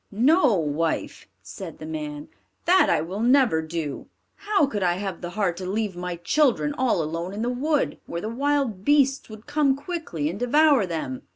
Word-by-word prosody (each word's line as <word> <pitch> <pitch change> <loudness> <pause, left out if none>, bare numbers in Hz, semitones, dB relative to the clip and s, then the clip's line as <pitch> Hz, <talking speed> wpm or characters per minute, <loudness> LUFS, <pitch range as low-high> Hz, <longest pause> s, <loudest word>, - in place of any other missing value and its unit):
"No, 260 - +4
wife," 160 -1 -2 0.2
said - - -9
the - - -9
man, 305 -1 -6 0.4
"that 370 +2 +5
I 165 - +2
will 180 +6 -5
never 245 -7 +4
do. 160 -3 -5 0.3
How 405 -4 +1
could 215 -7 -4
I 175 -2 +2
have 190 -1 -5
the 175 - -5
heart 180 -5 0
to 185 0 -5
leave 210 -1 -2
my 180 0 -4
children 285 - +1
all 255 - +1
alone 165 +4 -4
in 210 +2 -3
the 240 - 0
wood, 290 +4 0
where 170 - -4
the 215 - -4
wild 260 -4 -1
beasts 275 -1 +2
would 215 0 -11
come 290 -2 +2
quickly 285 - -4
and 175 +6 -4
devour 275 -3 +4
them?" 155 -7 -4
220 Hz, 185 wpm, -24 LUFS, 175-290 Hz, 0.4 s, that